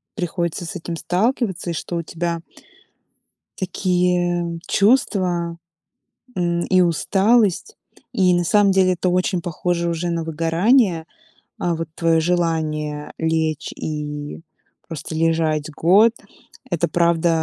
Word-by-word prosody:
приходится 175 -2 -3
с 180 - -7
этим 170 -1 -5
сталкиваться, 190 - -1
и - - -3
что 170 +2 -5
у 170 - -1
тебя 170 +1 -3 1.2
такие 180 -2 0
чувства, 185 -6 +1 0.8
м, 175 -1 0
и 185 -1 +3
усталость. 200 - +2 0.4
И 185 -2 +3
на 175 0 +2
самом 200 +3 +4
деле 190 -1 +3
это 180 +1 -1
очень 180 0 0
похоже 170 +1 -1
уже 170 +1 -2
на 165 -1 -1
выгорание. 165 - +2 0.5
А, 175 -1 0
вот 165 0 -4
твое 165 -1 +2
желание 155 -3 -1
лечь 160 -1 -1
и 150 -1 -5 0.5
просто 160 0 -6
лежать 160 -2 +1
год- 195 +9 +5 0.6
это 175 -3 0
правда, 170 +1 +2
170 Hz, 115 wpm, -21 LUFS, 165-185 Hz, 1.2 s, год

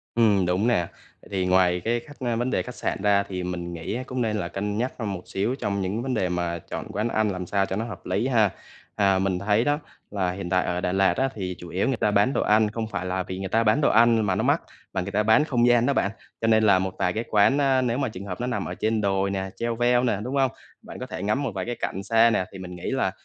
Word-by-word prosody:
Ừm, 105 -5 +4
đúng 90 +5 +1
nè. 100 -8 +2 0.4
Vậy - - -16
thì 95 -2 -1
ngoài 90 -1 +3
cái 120 +1 +1
khách 145 +4 -15
ơ, 120 -2 -1
vấn 120 +2 -1
đề - - +1
khách 125 - -8
sạn - - -3
ra 100 0 +4
thì 95 -2 -5
mình 90 -1 -4
nghĩ 85 +3 -5
á 125 - -3
cũng 130 -1 -2
nên 110 -2 0
là 85 -5 -2
cân 105 +3 -3
nhắc 125 +3 -1
hơn 110 -4 -3
một 90 - -6
xíu 105 +6 -1
trong 100 0 -1
những 100 +5 -2
vấn 130 0 -2
đề 90 - 0
mà 85 -1 -2
chọn - - -7
quán 105 +3 -1
ăn 110 -2 +1
làm 90 -2 -4
sao 100 +1 +1
cho 95 - -3
nó 110 - -1
hợp 105 -7 -9
lý 100 +6 0
ha. 110 -6 +3 0.5
À, 100 -2 +3
mình 95 -1 0
thấy 105 +4 +2
đó, 145 +2 +1 0.3
là 95 -3 -1
hiện 90 -1 -5
tại 90 0 +2
ở 90 0 -1
Đà 90 - -1
Lạt 95 0 +3
á 135 - +1
thì 95 -3 -4
chủ 90 - -9
yếu 90 +7 0
người 135 - +1
ta 105 - +1
bán 105 +6 +3
đồ - - 0
ăn, 105 +1 +4
không 110 +1 -3
phải 90 -4 -4
là 95 0 -1
vì 95 +1 -6
người 95 0 -4
ta 115 +4 +2
bán 110 +6 +3
đồ 145 - +4
ăn 115 +1 +5
mà 95 - +1
nó - - 0
mắc, - - +2 0.3
mà 95 - -1
người 90 +2 -4
ta 105 - +2
bán 110 +8 +4
không 120 -5 +2
gian 120 -1 +4
đó 140 - +3
bạn. 100 - +1 0.3
Cho 115 - 0
nên 110 -1 +4
là 100 -3 +5
một 95 0 -3
vài 90 - +1
cái 110 +4 -3
quán 110 +7 +4
á 135 -2 +3
nếu 120 0 0
mà 135 -2 0
trường 100 -3 -8
hợp 90 +1 -6
nó 125 - -1
nằm 125 - -2
ở - - -5
trên 110 0 0
đồi 100 -1 +1
nè, 95 -1 -3
cheo 115 0 -2
veo 120 +1 +3
nè, 110 -5 +1
đúng 130 +5 -3
hông? 135 -2 +3 0.3
Bạn - - -10
có - - -4
thể - - -6
ngắm 105 +8 0
một 135 - -1
vài 95 -1 -2
cái 120 0 -3
cảnh 95 - -3
xa 115 +3 +4
nè, 105 -4 +1
thì 95 - -9
mình 90 -1 -8
nghĩ 85 - -4
là - - +1
105 Hz, 300 wpm, -25 LUFS, 95-120 Hz, 0.5 s, ăn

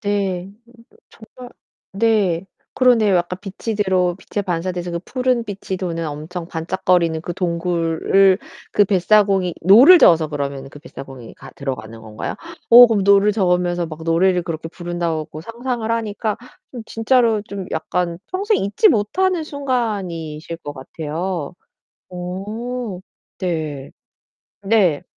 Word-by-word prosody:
네. 195 -3 -2 0.9
정말 250 -1 -10 0.4
네. 195 -5 +1 0.3
그러네요. 225 -6 +4
약간 175 +1 -2
빛이 200 +3 -5
들어 185 -3 +1
빛에 205 - -5
반사돼서 180 -1 -3
그 170 - -2
푸른 255 -2 0
빛이 195 -2 -5
도는 170 -3 -3
엄청 155 +4 -6
반짝거리는 170 -1 0
그 175 +1 -6
동굴을 175 +2 +2 0.3
그 205 - +4
뱃사공이 195 -1 +2
노를 240 - +8
저어서 160 - +5
그러면 140 -2 -4
그 145 - -12
뱃사공이 135 -6 -11
가 - - -13
들어가는 115 -5 -6
건가요? 110 -1 -6 0.3
오 245 +1 +11
그럼 220 -4 +1
노를 200 +1 +5
저으면서 180 -3 +1
막 160 0 -9
노래를 180 +2 +2
그렇게 165 -2 -5
부른다고 170 -3 -4
상상을 235 +1 -4
하니까 220 -2 -2 0.4
으 245 - -5
진짜로 225 -2 +2
좀 200 -2 -7
약간 170 +1 -2
평생 405 +3 +1
잊지 205 - +3
못하는 350 - +1
순간이실 195 - -3
것 145 -3 -7
같아요. 160 +4 -5 0.6
어 200 +5 -5 0.4
네. 155 -7 -4 0.7
네. 195 -7 +2
185 Hz, 275 characters per minute, -20 LUFS, 165-215 Hz, 0.9 s, 오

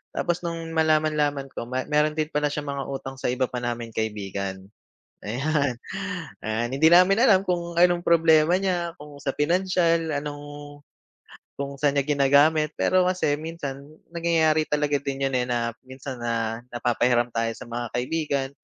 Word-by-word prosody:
Tapos 175 0 -1
nung 165 -1 -4
malaman-laman 155 -3 +1
ko 115 - -6
ma 130 +1 -2
mayro'n 150 0 +2
din 155 -1 0
pala 150 0 +1
siyang 145 0 -4
mga 140 - -3
utang 135 0 -6
sa - - -2
iba 130 +1 0
pa 125 - -5
naming 120 -1 -3
kaibigan, 100 -3 -4 0.6
ayan. 135 +3 0 0.7
Ah, 110 +2 -1
hindi 140 +5 +4
namin 185 +3 +6
alam 195 -6 +5
kung 170 -2 -2
anong 175 0 +4
problema 165 0 +5
niya, 175 -3 -1
kung 150 -1 -11
sa 135 -1 -2
pinansyal, 170 0 +1
anong 145 0 -8 0.8
kung 140 0 -4
saan 145 0 +2
niya 140 - -1
ginagamit. 145 +2 +4
Pero 185 -1 +3
kasi 180 -5 +1
minsan 145 -4 -6 0.3
nangyayari 160 -2 +2
talaga 150 -1 +1
din 135 -1 -3
'yon, 130 - -2
eh, 125 - 0
na 115 -1 -1
minsan 130 0 -8
na 115 0 -2
napapahiram 120 0 +1
tayo 115 0 -1
sa - - -10
mga 120 +1 -3
kaibigan. 140 +1 -1
145 Hz, 160 wpm, -25 LUFS, 125-165 Hz, 0.8 s, namin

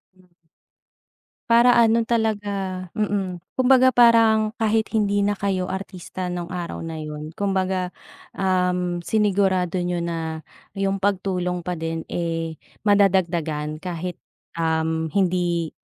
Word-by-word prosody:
Hmm. 185 0 -24 1.2
Para 235 +1 +6
ano 230 -1 +4
talaga, 205 -5 -1
mm. 195 -4 -2
Kumbaga 260 0 +5
parang 225 -2 +5
kahit 220 -1 +1
hindi 205 -2 +2
na 205 +1 +1
kayo 190 -2 -1
artista 185 -1 -6
nung 175 -1 -4
araw 175 -2 -5
na 165 -1 -5
yun 150 0 -6
kumbaga, 190 -2 -1 0.4
um, 180 -2 0
sinigurado 190 -3 +1
niyo 175 0 -1
na 165 -2 -3 0.3
yung 195 0 -1
pagtulong 180 -2 0
pa 180 +1 -3
din, 165 0 -3
eh, 165 -1 -2 0.3
madadagdagan 170 -7 +2
kahit 180 -1 -4 0.4
um, 160 -1 0
hindi 175 -3 +1
185 Hz, 115 wpm, -23 LUFS, 170-205 Hz, 1.2 s, Para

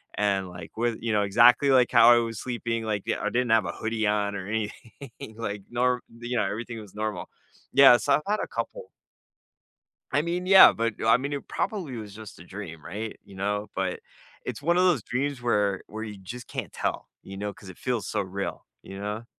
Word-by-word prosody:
and 100 -2 0
like 90 -2 -10
with 120 0 0
you 115 -1 -1
know, 105 -1 +3
exactly 120 +6 +6
like 125 -2 +4
how 115 - +7
I - - +4
was 115 -2 -5
sleeping, 120 -2 -3
like 105 -3 -2 0.2
I 105 - -2
didn't 120 0 0
have 110 -4 +4
a - - -2
hoodie 110 -1 -1
on 100 -1 0
or 95 - -7
anything 110 +2 -6
like 105 -3 -4
nor 125 +1 +1 0.2
you 120 0 -2
know, - - +2
everything 115 +1 -5
was 105 -1 -14
normal. 110 0 -3 0.5
Yeah, 135 -3 +8
so 140 - +1
I've 150 - -2
had 215 - +1
a - - -4
couple. - - -5 1.2
I 145 - +2
mean, 175 +2 -2
yeah, 190 0 +9
but 115 -1 -1
I 115 +1 +6
mean, 140 +2 -4
it 140 - -4
probably 170 - -3
was 105 -2 -8
just 110 -4 -11
a 85 - -12
dream. 85 -5 -9
Right? 105 +5 -6
You 100 - -15
know? 105 +1 -2
But 95 -1 -2 0.4
it's - - -5
one 170 +3 +2
of 180 - +4
those 165 - +3
dreams 135 +2 -2
where 105 -5 +1
where 110 +1 -7
you 105 -2 -7
just 120 +6 -9
can't - - -5
tell, - - -3
you 95 0 -9
know, 105 +1 -4
'cause 100 - -14
it 90 - -11
feels 125 -4 -2
so 105 - -1
real. 95 +1 -5 0.2
You 95 0 -9
know? 105 +3 -4
110 Hz, 215 wpm, -26 LUFS, 105-125 Hz, 1.2 s, yeah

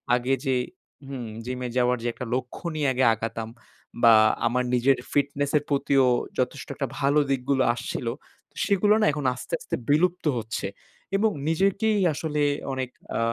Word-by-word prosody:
আগে 125 +2 0
যে 130 -1 +2 0.5
হুম, 130 -4 -6 0.2
জিমে 125 0 -3
যাওয়ার 125 0 +3
যে - - -1
একটা 125 - -6
লক্ষ্য 125 +6 -5
নিয়ে 150 -2 0
আগে 130 +1 +1
আগাতাম। 115 0 -4 0.5
বা 115 -1 +8 0.3
আমার 125 +2 +1
নিজের 130 +2 +3 0.2
ফিটনেসের 145 +1 +1
প্রতিও 140 -2 +3 0.3
যথেষ্ট - - -2
একটা - - -2
ভালো 140 +2 +3
দিকগুলো 130 0 +1
আসছিল। 120 0 -5 0.6
সেগুলো 205 +1 +3
না - - +4
এখন 150 -2 -4
আস্তে 130 - -9
আস্তে - - -4
বিলুপ্ত 180 +5 +2
হচ্ছে। 110 -2 -4 0.5
এবং 215 +1 +2 0.2
নিজেকেই 195 +6 +2
আসলে 150 0 -2 0.3
অনেক 130 -1 -3 0.3
আ - - 0
135 Hz, 150 wpm, -25 LUFS, 125-150 Hz, 0.6 s, বা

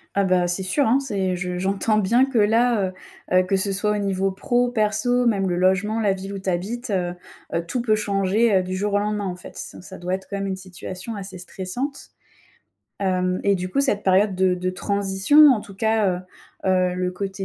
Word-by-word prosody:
Ah 200 -1 +2
bah, 180 -1 +2
c'est 175 +2 0
sûr, 275 +10 +1
hein, 260 +4 +4
c'est 190 -8 -2
je 180 0 -3
j'entends 195 +3 +1
bien 235 +6 +3
que 265 -3 -3
là, 220 -1 +3 0.4
heu 185 - +5
heu, 185 - +5
que 195 +2 0
ce 195 +1 +1
soit 210 +2 +1
au - - -1
niveau 195 -1 0
pro, 245 +5 0
perso, 245 +2 +1
même 195 -4 +2
le 175 - 0
logement, 190 +5 +1
la 205 -2 +2
ville 195 +1 -5
où 195 - -5
tu 190 - -3
habites, 215 +8 -3
heu 180 -3 -1 0.4
heu, 170 0 -1
tout 245 +6 -2
peut 215 -3 +2
changer, 205 +1 +1
heu, - - +3
du 185 +1 -4
jour 205 +2 -1
au 205 - +3
lendemain, 210 0 -2
en 180 -1 -4
fait. - - -12
C - - -7
ça 190 +1 -10
doit 180 +1 -3
être 190 - -9
quand 200 - -4
même, 195 0 -2
une 190 -1 -3
situation 185 +3 -7
assez 190 -2 -7
stressante, 195 +10 -5 0.9
hem 185 -1 0
et 200 -1 +3
du 185 +1 -4
coup, 275 - +1
cette 210 -7 +1
période 190 0 +3
de 185 -1 +3
de 185 0 -2
transition, 200 +10 +4
en 215 - -1
tout 200 - -12
cas, 220 0 +1 0.6
heu - - 0
heu, 180 -1 +2
le 180 0 -1
côté 195 +1 -5
195 Hz, 225 wpm, -23 LUFS, 185-215 Hz, 0.9 s, heu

